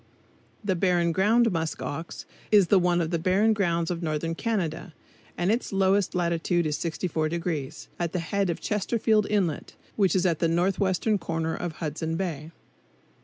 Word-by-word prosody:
The 195 -2 0
Barren 175 -1 +2
Ground 220 +6 +3
Musk 165 -2 -2
ox 160 +4 -6 0.3
is 205 -4 +5
the 200 - +6
one 175 -1 +2
of 165 0 -2
the 170 - 0
Barren 195 +6 +3
Grounds 170 -5 0
of 170 -1 -3
northern 160 0 -2
Canada, 180 -5 -3 0.4
and 175 +3 +1
its 235 +3 -1
lowest 195 0 +2
latitude 170 0 0
is 150 -1 0
64°, 160 -3 -3
at 170 -2 -1
the - - -2
head 195 +3 -1
of 170 - -2
Chesterfield 215 0 +1
Inlet, 190 -7 -1 0.2
which 195 -3 +2
is 185 0 +2
at 170 -4 +1
the 165 - +2
northwestern 190 +4 +1
corner 165 -1 -2
of 175 -2 -4
Hudson 160 +1 -3
Bay. 160 -5 -4
175 Hz, 165 wpm, -26 LUFS, 165-195 Hz, 0.4 s, the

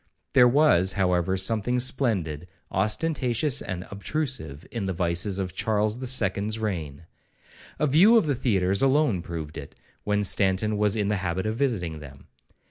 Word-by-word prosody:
There 125 -3 +7
was, 120 - +3
however, 90 -1 0
something 115 +5 +1
splendid, 100 - -1 0.2
ostentatious, 125 - 0
and 90 -1 -5
obtrusive, 100 - -4
in 110 -5 -3
the 95 - -2
vices 85 +3 -1
of 95 -3 -4
Charles 110 +3 -1
the 130 - -4
Second's 105 -3 0
reign.—A 85 - -7
view 180 - +5
of 220 - +3
the 145 - +1
theatres 100 -6 +1
alone 135 - +2
proved 80 -3 -7
it, - - -11 0.3
when 105 0 0
Stanton 100 +2 +2
was 105 0 +2
in 105 -2 -1
the 105 - 0
habit 95 0 -3
of 110 +1 -2
visiting 100 - -2
them. 70 -2 -13
105 Hz, 150 wpm, -25 LUFS, 90-125 Hz, 0.3 s, There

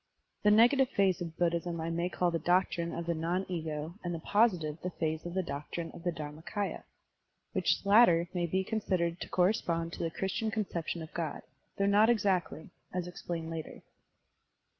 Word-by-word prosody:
The 210 - +4
negative 245 +5 +5
phase 190 -3 +2
of 165 -1 -5
Buddhism 170 0 0
I 165 +1 -2
may 170 +2 0
call 180 -1 +1
the 165 - -1
doctrine 175 0 +1
of 170 - -4
the 170 - 0
non 170 +4 -1
ego 160 0 -4
and 175 -1 -2
the - - -5
positive 175 -6 +2 0.2
phase 160 -1 0
the 180 +2 -2
doctrine 165 +2 -5
of - - -11
Dharmak&ya 165 +4 -4 0.7
(which - - +1
latter 200 -5 +6
may 175 -2 0
be 190 +3 0
considered 185 -5 -1
to - - -5
correspond 175 -3 +1
to - - -7
the 165 - 0
Christian 190 +6 -2
conception 175 -6 -3
of 160 - -11
God, 165 -4 -3 0.3
though 195 - +2
not 205 +3 +5
exactly, 190 -7 0 0.2
as 180 -1 -2
explained 170 -2 -5
later). 160 -1 -6
175 Hz, 165 wpm, -31 LUFS, 165-190 Hz, 0.7 s, latter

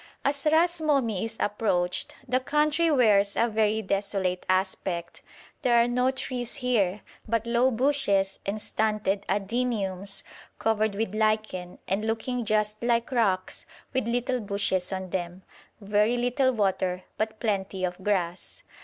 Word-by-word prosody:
As 280 +1 0
Ras 340 +1 +3
Momi 260 -10 +1
is 225 0 -5
approached 185 -4 0
the 255 +1 +2
country 300 +5 +2
wears 210 -8 +4
a 235 - +3
very 220 -1 +1
desolate 195 -2 -1
aspect; 185 -2 -1 0.4
there 245 -2 +3
are 235 0 +5
no 250 +1 +2
trees 255 -1 -3
here, 220 -8 +1 0.3
but 230 0 0
low 240 +2 +3
bushes 225 -7 +1
and 200 +2 -2
stunted 210 -2 0
adeniums 200 -2 -1 0.3
covered 215 -2 +1
with 215 -1 -2
lichen, 215 -4 0
and 200 +3 0
looking 235 +2 -2
just 215 0 0
like 235 0 +1
rocks 200 -7 0 0.3
with 260 -3 0
little 245 +2 0
bushes 200 -3 -1
on 190 -1 -4
them; 180 0 -4 0.4
very 210 +3 +2
little 250 +2 +2
water, 190 -4 0 0.2
but 220 0 -2
plenty 195 -4 -1
of 180 +1 -5
grass. 180 -3 -2
215 Hz, 135 wpm, -27 LUFS, 195-245 Hz, 0.4 s, are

